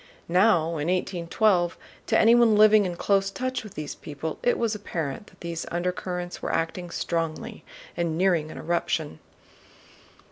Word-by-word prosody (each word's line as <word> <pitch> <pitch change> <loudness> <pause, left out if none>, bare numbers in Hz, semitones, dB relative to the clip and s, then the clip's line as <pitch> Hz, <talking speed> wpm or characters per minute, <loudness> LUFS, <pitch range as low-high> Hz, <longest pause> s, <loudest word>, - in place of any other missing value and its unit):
Now 180 +1 +4 0.2
in 150 +1 -2
1812, 180 0 +1 0.3
to - - +3
anyone 230 -1 +6
living 215 -1 +6
in 175 - -4
close 195 +2 +1
touch 255 +4 -3
with 215 - -11
these 150 -1 -5
people 150 +1 -6
it 245 - +2
was 230 -2 0
apparent 170 -4 -4
that 185 - -21
these 170 -1 -5
undercurrents 180 0 -3
were - - -2
acting 175 +2 -2
strongly 170 +7 -3 0.3
and 170 -2 -1
nearing 175 -4 +2
an - - -9
eruption. 160 - -2
180 Hz, 145 wpm, -26 LUFS, 165-210 Hz, 0.3 s, anyone